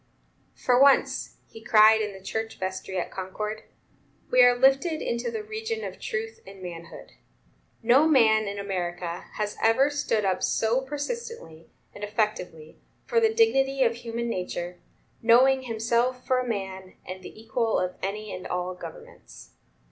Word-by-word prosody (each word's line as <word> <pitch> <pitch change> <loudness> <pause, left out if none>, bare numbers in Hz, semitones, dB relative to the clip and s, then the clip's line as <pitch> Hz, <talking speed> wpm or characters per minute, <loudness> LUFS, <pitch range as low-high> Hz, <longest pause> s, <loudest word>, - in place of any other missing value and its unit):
"For 250 0 +2
once," 280 0 +3
he 225 - -13
cried 220 -1 +6
in 210 -1 -2
the 190 -1 -12
church 220 0 -4
vestry 190 0 -4
at 180 - -3
Concord, 210 +3 -5 0.7
"we 250 - +6
are 245 0 +7
lifted 270 +5 +3
into 235 - -2
the 445 -2 -4
region 440 +1 -4
of - - -7
truth 455 -1 -4
and 195 - -11
manhood. 170 -2 -9 0.7
No 260 +7 +5
man, 220 -7 +4
in 200 0 -4
America, 175 -3 -4
has 210 -1 -3
ever 245 +6 +4
stood 225 -7 0
up 185 -1 0
so 230 +4 +1
persistently 290 - -6 0.2
and 205 - -10
effectively 205 -7 -3 0.3
for 475 - +2
the 445 -1 +3
dignity 275 - +3
of 235 -2 +2
human 235 0 -4
nature; 180 -4 -4 0.4
knowing 255 +3 +5
himself 240 +1 -1
for 255 -1 +2
a 250 - -3
man, 190 -4 -5
and 185 0 -7
the 185 - -11
equal 225 0 0
of 180 0 -1
any 210 +2 -4
and 185 - -6
all 180 0 -2
governments. 480 - -12
225 Hz, 155 wpm, -26 LUFS, 190-270 Hz, 0.7 s, are